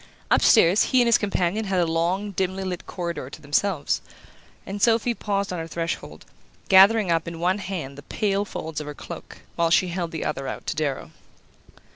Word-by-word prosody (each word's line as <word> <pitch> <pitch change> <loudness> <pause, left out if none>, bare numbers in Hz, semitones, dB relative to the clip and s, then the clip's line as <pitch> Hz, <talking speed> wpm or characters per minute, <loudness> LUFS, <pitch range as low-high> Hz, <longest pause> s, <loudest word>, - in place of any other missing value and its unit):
Upstairs, 180 +5 +5
he 255 - +3
and 240 - +3
his 235 - +5
companion 200 +1 0
had 190 -1 -1
the 175 - +3
long 175 +5 -1
dimly 190 0 -2
lit 180 -2 -5
corridor 170 -7 -4
to 145 - -10
themselves, 150 +3 0 0.6
and 200 +1 -6
Sophy 235 +1 +3
paused 200 -4 -2
on 180 - -3
her 165 - -5
threshold, 165 +1 -5 0.4
gathering 195 0 +6
up 165 0 +1
in 170 -1 -6
one 185 +4 +1
hand 165 -9 -5
the - - -9
pale 200 +4 -1
folds 160 -6 -5
of 150 - -8
her 150 - -6
cloak, - - -10
while 170 -1 +2
she 180 +2 +3
held 175 -1 -3
the 160 -1 -5
other 135 - -3
out - - -6
to - - -2
Darrow. 145 -3 -2
180 Hz, 190 wpm, -24 LUFS, 165-200 Hz, 0.6 s, gathering